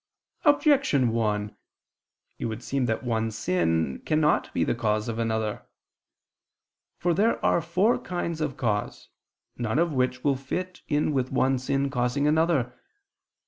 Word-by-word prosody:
Objection 280 - +4
1: 105 -2 -1 0.8
It - - -3
would 110 +1 -4
seem 135 -1 -1
that 110 +2 -1
one 115 -2 0
sin 85 -9 0
cannot 155 -1 +1
be - - 0
the - - +1
cause 110 -2 -1
of 115 0 -3
another. 110 -2 -1 1.4
For 175 0 +1
there 210 +7 +2
are - - +3
four 180 +7 +2
kinds 170 -3 -4
of 145 -4 -2
cause, 105 -6 -2 0.5
none 120 +1 -1
of 170 -1 +2
which 130 -1 0
will 140 -2 +3
fit 180 +7 -5
in 150 0 +1
with 130 -2 -1
one 130 0 +2
sin 135 +2 -1
causing 125 +3 0
another. 150 -5 +2
130 Hz, 140 wpm, -26 LUFS, 110-155 Hz, 1.4 s, Objection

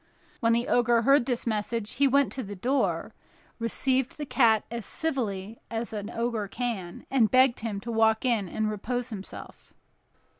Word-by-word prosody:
When 230 -2 +3
the 235 +1 +1
Ogre 240 -1 +3
heard 275 0 +4
this 245 -3 -1
message, 215 0 -2
he 280 +1 +5
went 280 +1 +3
to 265 - -3
the 205 -3 -7
door, 260 +9 0 0.5
received 255 +3 0
the 295 - -4
cat 225 -6 +3
as 235 -1 -4
civilly 225 -8 -2
as 225 0 -3
an 205 -1 -4
Ogre 230 -3 -2
can, 200 -6 -4
and 240 -5 +4
begged 255 -1 +4
him 215 -3 -3
to 235 - -5
walk 220 +1 +3
in 220 -7 +1
and 220 +4 -1
repose 240 +4 -3
himself. 200 -4 -10
230 Hz, 165 wpm, -27 LUFS, 215-250 Hz, 0.5 s, he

